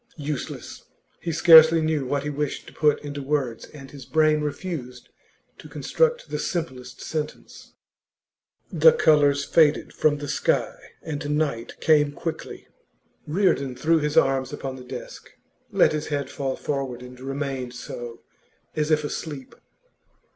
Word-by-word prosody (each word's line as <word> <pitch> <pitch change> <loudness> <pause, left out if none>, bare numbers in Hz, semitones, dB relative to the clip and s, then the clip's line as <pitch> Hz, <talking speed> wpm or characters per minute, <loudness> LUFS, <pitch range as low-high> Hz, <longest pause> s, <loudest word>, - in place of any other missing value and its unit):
Useless; 145 -3 -6 0.3
he 170 - -3
scarcely 160 0 +8
knew 155 -4 0
what 140 +1 -1
he 150 - -3
wished 145 0 -3
to - - -13
put 150 -2 +2
into 145 -1 -5
words, 135 -4 -2
and 135 -3 -12
his 140 -2 -10
brain 155 +2 +2
refused 145 -5 -5 0.5
to - - -12
construct 485 +1 0
the - - -2
simplest 130 -8 -4
sentence. 155 -1 -6 1.0
The 485 - +6
colours 145 - +3
faded 150 0 +3
from 150 -1 +2
the 145 0 -6
sky, - - 0 0.3
and 150 -1 -3
night 140 -7 -2
came 150 -2 +4
quickly. 165 +3 -6 0.6
Reardon 150 -6 +1
threw 160 +6 +2
his 150 0 -2
arms 135 -1 +3
upon 135 -1 -5
the 130 - -10
desk, - - -9 0.4
let 195 -3 +4
his 150 -1 -3
head 145 -2 -3
fall 135 -2 -3
forward, 135 -4 -4
and 125 0 -12
remained 135 -2 -4
so, 120 -1 -8 0.5
as 150 0 0
if 155 -1 +2
asleep. 145 -2 -6
145 Hz, 140 wpm, -24 LUFS, 135-155 Hz, 1.0 s, scarcely